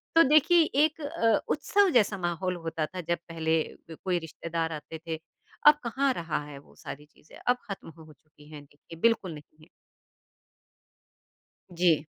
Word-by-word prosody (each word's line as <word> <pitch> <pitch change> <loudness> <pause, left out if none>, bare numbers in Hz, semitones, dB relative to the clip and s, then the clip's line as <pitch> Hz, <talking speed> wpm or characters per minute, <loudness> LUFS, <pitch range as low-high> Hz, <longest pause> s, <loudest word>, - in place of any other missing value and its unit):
तो 330 - +8
देखिए 310 +3 +6 0.2
एक 315 +1 0
अ, 230 -6 +2
उत्सव 405 -3 +2
जैसा 215 - +3
माहौल 180 +1 -2
होता 165 -2 -3
था 180 +3 -7
जब 170 +1 -1
पहले 160 -1 +1 0.3
क 160 - -9
कोई 180 -2 +1
रिश्तेदार 165 0 -4
आते 155 +1 -7
थे। 160 -1 -3 0.5
अब 300 0 +8
कहाँ 265 +4 +1
रहा 165 -7 -3
है 145 -1 -10
वो 140 - -21
सारी 150 -1 -9
चीज़ें, 150 +1 -18
अब 245 0 +4
ख़त्म 195 -4 -6
हो 160 -1 -14
चुकी 150 +1 -21
हैं 150 -2 -9
देखिए 150 +3 -15
बिल्कुल 230 -7 +2
नहीं 155 +1 -14
है। 155 - -18 2.1
जी। 170 -3 +3
165 Hz, 160 wpm, -28 LUFS, 155-230 Hz, 2.1 s, तो